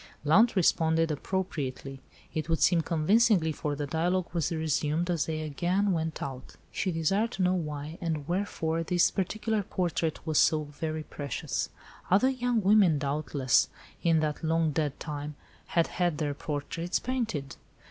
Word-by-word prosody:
Blount 215 +11 +5
responded 165 -3 +3
appropriately; 140 -5 -3 0.3
it 155 0 -3
would 165 - +1
seem 175 -2 +4
convincingly, 170 +2 +3
for 150 -1 -3
the 145 0 -3
dialogue 175 +4 0
was 170 0 0
resumed 160 +1 0
as 170 -4 0
they 155 -1 -2
again 175 +7 0
went 160 -2 -2
out. 130 -2 -7 0.2
She 190 - -1
desired 195 +7 +1
to 190 - -1
know 180 0 +3
why, 150 -2 -4
and 155 -4 -2
wherefore, 170 -3 -1
this 175 +1 +2
particular 215 +3 -1
portrait 170 -5 -2
was 155 -2 +2
so 155 -1 +4
very 155 +1 -4
precious. 145 -2 -4 0.4
Other 205 +8 +5
young 245 -3 0
women, 195 -5 +5
doubtless, 140 -3 +1 0.3
in 165 -2 +3
that 155 +1 -2
long 160 0 +2
dead 145 -1 -1
time, 150 -1 -5 0.3
had 170 -1 +2
had 175 -4 -1
their 145 -2 -1
portraits 155 +4 -3
painted. 225 - -3
160 Hz, 150 wpm, -29 LUFS, 150-185 Hz, 0.4 s, Blount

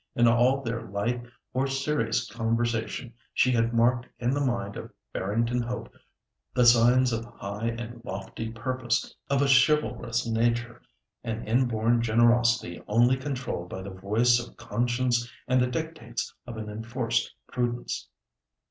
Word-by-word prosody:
In 120 0 +5
all 125 +4 +4
their 115 -1 -2
light 115 +3 -2 0.3
or 130 +2 +1
serious 135 -4 0
conversation, 115 +2 -1 0.2
she 125 - +4
had 115 -1 +2
marked 120 +1 +2
in 120 +1 0
the 145 +1 +1
mind 120 -6 -1
of - - -7 0.2
Barrington 115 +5 0
Hope 120 -1 -5 0.6
the 125 - +4
signs 120 +1 +6
of 115 0 -1
high 110 -2 -5
and 115 0 -5
lofty 100 +1 -5
purpose, 120 +1 -2 0.2
of 140 0 +3
a - - +2
chivalrous 135 -3 +3
nature, 115 +1 0 0.4
an 115 -1 -4
inborn 115 -1 +2
generosity 115 -4 +3
only 120 +4 +4
controlled 130 -9 -4
by 95 - -6
the 100 - -7
voice 110 +6 +3
of 120 0 -9
conscience 120 +1 0 0.2
and 130 0 +3
the 125 - +3
dictates 155 -4 -4
of 120 -2 -6
an 110 -1 -5
enforced 115 +2 -2
prudence. 120 -1 -2
120 Hz, 140 wpm, -27 LUFS, 115-125 Hz, 0.6 s, signs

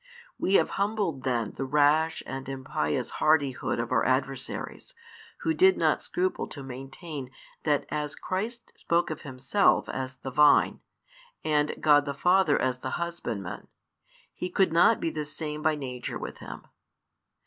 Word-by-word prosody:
We 195 - +2
have - - +4
humbled 200 -9 0
then 120 -5 0
the - - -2
rash 150 +4 +2
and 135 0 -6
impious 130 - -2
hardihood 145 -6 +2
of 120 +1 -3
our 120 -3 +3
adversaries, 130 0 -2 0.5
who 320 - +1
did 375 +3 +5
not - - +2
scruple 370 +1 -1
to 140 - -8
maintain 135 +2 -7 0.4
that 150 -2 +2
as 150 -1 -3
Christ 220 +6 -4
spoke 170 -1 0
of 155 - -5
Himself 135 +9 +2
as 130 0 -4
the 135 0 -7
Vine, 150 +2 +5 0.6
and 150 -1 +1
God 145 -2 +5
the 140 -1 -3
Father 180 0 +3
as 130 -1 0
the 130 0 -3
Husbandman, 120 - -5 0.7
He 180 - -4
could 185 -1 +2
not 195 +7 +5
be 165 - -1
the 155 - -3
same 150 0 -5
by 155 0 +2
nature 130 -4 -5
with - - -7
Him. - - -9
150 Hz, 150 wpm, -28 LUFS, 130-170 Hz, 0.7 s, did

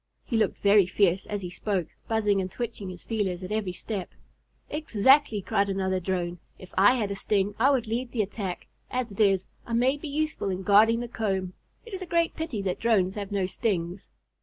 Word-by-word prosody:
He 235 - -3
looked 220 -3 +2
very 200 -2 +6
fierce 190 -1 +2
as 205 -2 -3
he 175 - -5
spoke, 185 0 -1 0.2
buzzing 210 -3 +2
and 185 - -3
twitching 215 -2 -5
his 180 -1 -9
feelers 195 -5 -2
at 185 - -6
every 210 -3 -1
step. 190 +1 -5 0.6
"Exactly!" 265 -5 +3
cried 200 +2 +1
another 190 -1 0
Drone. 175 -1 -2 0.2
"If 185 - -13
I 205 +6 +6
had 210 -5 -1
a - - -2
sting, 200 0 0
I 260 +4 +5
would 265 -5 +2
lead 235 +3 -3
the 225 -4 +1
attack. 195 -2 -5 0.2
As 250 -3 -2
it 200 - -11
is, 195 -3 +3 0.2
I 235 - -6
may 255 +4 +3
be 305 - -7
useful 305 -7 -1
in 190 0 -3
guarding 220 +4 +5
the 240 - -4
comb. 195 -5 -2 0.3
It 460 - -11
is 380 - -4
a 370 - -6
great 335 0 +1
pity 295 -11 -3
that 185 -2 -2
Drones 200 -5 +2
have 205 -1 -5
no 195 -2 +1
stings." 185 -2 -2
205 Hz, 210 wpm, -27 LUFS, 190-235 Hz, 0.6 s, very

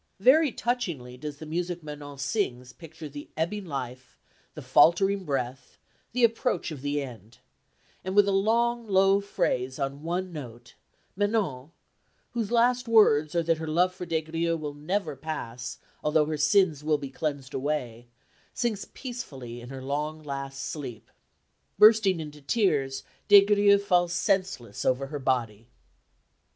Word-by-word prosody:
Very 280 +7 +5
touchingly 170 - -3
does 145 +3 -7
the 155 - -9
music 175 +2 -3
Manon 145 -1 -8
sings 130 - -2
picture 160 -1 -10
the 145 0 -9
ebbing 190 +5 -2
life, 130 -4 -6 0.4
the - - -7
faltering 195 +3 +4
breath, 130 -3 -4 0.3
the 245 +1 0
approach 225 -6 +1
of 145 -4 -7
the 145 0 -1
end; 115 -4 -11 0.7
and, 190 +1 -4
with 205 -1 +6
a - - +2
long, 230 +4 +1
low 195 0 +4
phrase 130 -9 -1
on 140 +1 -3
one 175 +3 -3
note, 120 -5 -9 0.4
Manon, 195 - -1 0.6
whose 230 -4 -2
last 245 +1 +3
words 155 -9 +4
are 170 - +2
that 165 -1 +1
her 160 - -5
love 180 +4 +2
for 180 -1 -7
Des 160 -1 0
Grieux 165 +1 -1
will 150 -2 -5
never 155 +2 -2
pass 125 -4 -6 0.3
although 150 0 +3
her 155 +1 -2
sins 150 0 +3
will 155 0 +2
be 140 -2 -7
cleansed 140 -3 -4
away, 125 -4 -3 0.5
sinks 225 -5 -2
peacefully 135 - -7
in 120 - -10
her 135 -1 -7
long 150 +3 -3
last 135 -1 -5
sleep. 130 -8 -7 0.7
Bursting 210 -3 +6
into 150 -1 -8
tears 140 - 0 0.2
Des 200 -1 +8
Grieux 205 -1 +5
falls 180 -3 +1
senseless 185 - -1
over 130 +1 +1
her 145 +1 -6
body. 115 -5 -1
155 Hz, 150 wpm, -27 LUFS, 135-195 Hz, 0.7 s, Des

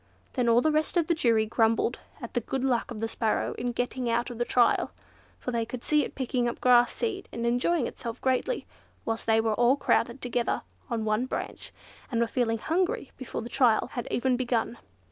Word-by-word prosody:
Then 245 -3 +1
all 230 +1 +5
the 310 - +2
rest 310 +3 +1
of 340 - +3
the 340 - +2
jury 230 -8 +3
grumbled 225 +2 +1 0.2
at 235 - -8
the - - +2
good 265 +3 -3
luck 255 -3 +1
of 225 -3 -6
the 225 - 0
Sparrow 225 -1 0
in 245 +1 -3
getting 245 +1 -2
out 235 +2 0
of 240 - -8
the 240 - +1
trial—for 245 +1 -1
they 235 -1 0
could 235 +1 -6
see 300 -1 +3
it - - -7
picking 250 -2 0
up - - -6
grass 245 -1 +5
seed 420 -5 -3
and 235 0 -3
enjoying 245 +5 +2
itself 230 0 -6
greatly, 260 - 0 0.4
whilst 225 0 -2
they 225 0 +4
were 225 -1 +1
all 240 +4 +4
crowded 275 -2 +1
together 245 -1 -1 0.3
on 230 -3 -1
one 215 +4 +1
branch, - - -5 0.4
and 235 -4 -1
were 235 - +3
feeling 230 -1 0
hungry 365 - -1
before 260 -3 -5
the - - -6
trial 240 -3 +3
had 240 - -4
even 255 +1 +1
begun. 240 -2 -1
240 Hz, 205 wpm, -28 LUFS, 230-260 Hz, 0.4 s, all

